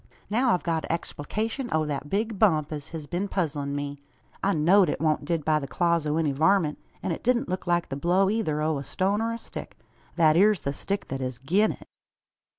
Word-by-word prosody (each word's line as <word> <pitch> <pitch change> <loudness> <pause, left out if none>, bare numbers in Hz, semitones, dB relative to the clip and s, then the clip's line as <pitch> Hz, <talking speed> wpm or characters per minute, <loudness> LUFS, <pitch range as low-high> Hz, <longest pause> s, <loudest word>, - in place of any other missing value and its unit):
Now 240 +1 +3
I've 180 - -5
got 165 -2 -1
a - - -4
explication 220 - -3
o' 155 0 +1
thet 145 -1 -4
big 215 +2 -1
bump 155 -8 +3
as 150 -1 -5
hez 160 -2 -7
been 180 +6 -2
puzzlin' 145 -7 -2
me. 145 0 -4 0.4
I 200 - +3
know'd 180 +3 +4
it - - -2
wan't 155 -2 +1
did 160 -1 -1
by 155 -1 +3
the 140 - -6
claws 170 0 +1
o' 150 +1 0
any 160 -3 +1
varmint; 160 +2 +2 0.2
an - - -1
it 165 - -3
didn't 250 +2 +1
look 185 0 -3
like 175 0 +1
the 135 - -3
blow 180 +7 +2
eyther 190 -8 0
o' 155 -2 0
a - - -6
stone 195 +8 0
or 230 0 0
a 230 - -3
stick. - - -9 0.4
Thet 155 -2 +5
ere's 205 +1 +4
the 140 - -2
stick 200 +7 -3
that 135 0 -3
hez 130 -2 -3
gi'n 185 - +2
it." - - -15
165 Hz, 225 wpm, -26 LUFS, 150-200 Hz, 0.4 s, Thet